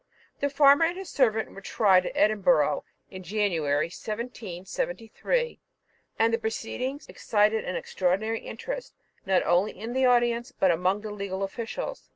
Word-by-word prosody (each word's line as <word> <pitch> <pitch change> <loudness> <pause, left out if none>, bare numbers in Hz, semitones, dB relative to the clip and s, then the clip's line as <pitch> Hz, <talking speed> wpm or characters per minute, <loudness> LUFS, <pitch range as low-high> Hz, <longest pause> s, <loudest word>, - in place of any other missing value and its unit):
The 285 - 0
farmer 280 +2 +6
and 345 +2 -2
his 385 -2 -7
servant 225 -5 +1
were 195 - -11
tried 195 -3 +3
at - - -3
Edinburgh 215 +5 +3 0.3
in 185 - -8
January 170 -7 0
1773, 215 - -4 0.6
and 225 +1 +3
the 230 - +2
proceedings 250 +5 -4
excited 215 0 +1
an 180 - -3
extraordinary 195 +7 -1
interest, - - -7 0.3
not 190 -1 +3
only 180 +4 +2
in 225 +3 -5
the 260 0 +2
audience, 240 +1 +2
but 190 -8 +2
amongst 185 +5 0
the 215 - -5
legal 195 -1 -4
officials. 230 - -5
220 Hz, 145 wpm, -27 LUFS, 190-250 Hz, 0.6 s, farmer